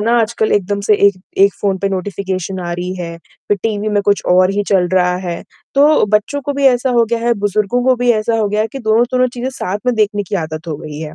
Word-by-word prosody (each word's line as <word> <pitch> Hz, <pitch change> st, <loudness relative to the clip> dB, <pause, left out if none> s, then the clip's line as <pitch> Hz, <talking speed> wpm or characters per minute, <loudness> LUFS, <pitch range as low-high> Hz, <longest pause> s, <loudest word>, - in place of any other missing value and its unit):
ना 225 Hz, +3 st, +1 dB
आजकल 220 Hz, -1 st, 0 dB
एकदम 200 Hz, 0 st, 0 dB
से 210 Hz, +1 st, +3 dB
एक 200 Hz, -, +3 dB, 0.3 s
1 200 Hz, -, +4 dB
फ़ोन 195 Hz, -2 st, 0 dB
पे 195 Hz, -, -1 dB
नोटिफिकेशन 190 Hz, -1 st, -3 dB
आ 175 Hz, 0 st, -4 dB
रही 180 Hz, +1 st, -4 dB
है, 170 Hz, -2 st, -6 dB, 0.3 s
फिर 205 Hz, -, +2 dB
टीवी 215 Hz, -1 st, -1 dB
में 205 Hz, -1 st, +1 dB
कुछ 205 Hz, 0 st, +1 dB
और 185 Hz, +1 st, +4 dB
ही 205 Hz, +1 st, 0 dB
चल 190 Hz, -3 st, +3 dB
रहा 180 Hz, -1 st, +2 dB
है, 170 Hz, -1 st, -4 dB, 0.3 s
तो 295 Hz, +2 st, +5 dB
बच्चों 210 Hz, +7 st, 0 dB
को 285 Hz, +1 st, -3 dB
भी 280 Hz, 0 st, -1 dB
ऐसा 255 Hz, 0 st, +3 dB
हो 230 Hz, -, +5 dB
गया 235 Hz, +1 st, -2 dB
है, 235 Hz, +1 st, +1 dB
बुज़ुर्गों 205 Hz, +3 st, 0 dB
को 260 Hz, 0 st, +4 dB
भी 245 Hz, 0 st, +2 dB
ऐसा 225 Hz, +1 st, 0 dB
हो 215 Hz, -, +1 dB
गया 210 Hz, +1 st, 0 dB
है 220 Hz, -, +1 dB
कि 270 Hz, -, -5 dB
दोनों-तोनों 240 Hz, +2 st, +2 dB
चीज़ें 245 Hz, +1 st, -3 dB
साथ 205 Hz, -6 st, -4 dB
में 250 Hz, -, +2 dB
देखने 210 Hz, -2 st, +1 dB
की -, -, -3 dB
आदत 155 Hz, +1 st, -7 dB
हो 155 Hz, -, -3 dB
गई 150 Hz, 0 st, -8 dB
है, 155 Hz, -1 st, -7 dB
205 Hz, 255 wpm, -16 LUFS, 185-235 Hz, 0.3 s, तो